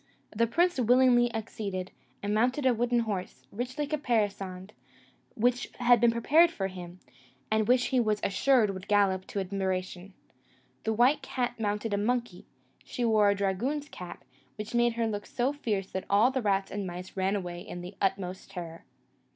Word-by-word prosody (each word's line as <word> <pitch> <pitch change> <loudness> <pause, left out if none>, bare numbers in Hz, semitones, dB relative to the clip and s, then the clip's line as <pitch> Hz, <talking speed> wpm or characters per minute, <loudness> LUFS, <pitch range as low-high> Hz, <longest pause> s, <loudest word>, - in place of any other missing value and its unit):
The 230 +2 +2
prince 345 +5 +2
willingly 245 0 +4
acceded, 205 -4 -4 0.3
and 205 +1 -1
mounted 250 +6 +1
a 255 - +5
wooden 240 +1 +1
horse, 200 -5 -5
richly 250 +6 -3
caparisoned, 205 -9 -2 0.6
which 245 +2 +1
had 245 -2 +4
been 235 - +6
prepared 300 +9 +4
for 205 - -4
him, 180 -1 -9 0.5
and 220 -1 +2
which 245 0 +4
he 260 - +2
was 215 -3 +1
assured 220 +2 +3
would 190 -1 -8
gallop 195 -3 +2
to 200 - -3
admiration. 190 -1 -3 0.7
The - - 0
beautiful 220 - +1
white 250 +6 +4
cat 245 -3 -3
mounted 210 0 -1
a - - +2
monkey; 235 -3 -2 0.4
she 245 - -3
wore 215 -2 +4
a 200 - +2
dragoon's 235 +10 -1
cap, 180 -1 -9 0.3
which 215 +2 -7
made 240 0 +3
her 230 0 -1
look 205 -2 -3
so 255 +3 0
fierce 210 -9 -3
that 190 - -4
all 210 +6 +4
the 260 -1 -1
rats 195 -3 0
and 200 -1 -3
mice 180 +1 -8
ran 190 +1 +1
away 175 -3 -4
in 175 - -8
the 180 +3 -9
utmost 190 -1 -2
terror. 170 -2 -8
215 Hz, 175 wpm, -29 LUFS, 195-245 Hz, 0.7 s, been